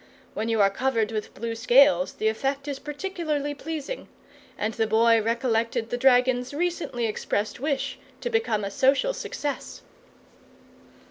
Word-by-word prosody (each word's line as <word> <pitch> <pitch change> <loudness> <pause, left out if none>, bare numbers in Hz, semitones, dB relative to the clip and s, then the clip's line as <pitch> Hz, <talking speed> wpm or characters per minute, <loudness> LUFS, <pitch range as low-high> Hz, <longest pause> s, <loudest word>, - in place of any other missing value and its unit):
When 220 +2 -2
you 225 -1 +1
are 195 0 +5
covered 230 -2 0
with 215 -1 -4
blue 230 +2 -3
scales, 230 -6 +4
the 215 - -1
effect 270 +5 -1
is 280 -2 -3
particularly 295 -2 -3
pleasing; 315 - -6 0.5
and 215 +2 -1
the 220 - 0
Boy 230 +1 +4
recollected 230 0 0
the - - +1
dragon's 250 0 +3
recently 335 -7 -1
expressed 215 0 -2
wish 280 0 -2 0.2
to 485 - -3
become 340 - +1
a 200 - -4
social 275 - +2
success. 290 - -5
250 Hz, 140 wpm, -26 LUFS, 225-290 Hz, 0.5 s, are